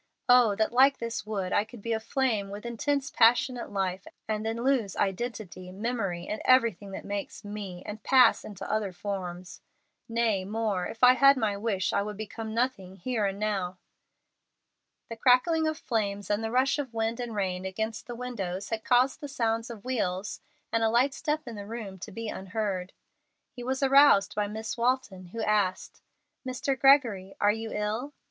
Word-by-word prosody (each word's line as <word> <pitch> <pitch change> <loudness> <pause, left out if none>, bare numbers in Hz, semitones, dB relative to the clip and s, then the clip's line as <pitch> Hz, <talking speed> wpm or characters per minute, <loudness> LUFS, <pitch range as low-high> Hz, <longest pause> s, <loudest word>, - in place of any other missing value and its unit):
Oh 245 -4 +6
that, 220 +1 +1
like 270 +3 +5
this 230 -2 -4
wood, 195 -4 -2
I 205 - +3
could 220 -1 -13
be 230 - -1
aflame 225 -2 0
with 205 +3 -8
intense, 280 +4 -1
passionate 245 +2 +3
life, 190 -1 -2 0.2
and 215 -1 -1
then 225 +1 -2
lose 250 -7 +1
identity, 195 -3 -3
memory, 195 -4 -3
and 215 - -4
everything 230 -6 +3
that - - -7
makes 200 0 -5
me, 200 -3 -6
and 210 +1 -7
pass 260 -2 +5
into 205 -3 -8
other 210 -3 -1
forms. 180 -2 -6 0.5
Nay, 230 -4 +1
more, 210 -2 -1
if 230 - -9
I 250 0 +9
had 275 +1 +6
my 215 -4 0
wish, 200 -2 -1
I - - +2
would 210 0 -5
become 220 +1 -6
nothing 230 -7 -1
here 215 +1 -1
and 195 0 -3
now." 195 -4 -1 1.3
The - - -3
crackling 315 +7 +4
of 315 0 -1
flames 205 -6 -2
and 205 +2 0
the 225 - -1
rush 260 +5 +2
of 260 -5 -5
wind 225 +1 -1
and 240 -3 -4
rain 185 -2 -1
against 220 +4 -4
the 240 - -6
windows 205 -7 -4
had 220 -1 -3
caused 250 +2 +3
the 290 - -5
sound 230 -3 -1
of 230 -1 -9
wheels, 205 -6 -2 0.3
and 230 - +1
a 225 - +3
light 250 +4 +3
step 305 -2 -2
in 235 - -6
the 200 -1 -7
room, 210 -4 -7
to 210 - -8
be 230 +3 -5
unheard. 190 -2 -3 0.6
He 245 - -9
was 260 +2 -1
aroused 275 -6 +6
by 205 0 0
Miss 220 +1 -5
Walton, 235 -6 0
who 220 +6 -5
asked, 205 -4 0 0.4
"Mr. 260 +1 -1
Gregory, 240 -8 +4
are 205 - +4
you 225 +1 -5
ill?" 220 +7 -2
220 Hz, 180 wpm, -28 LUFS, 200-245 Hz, 1.3 s, I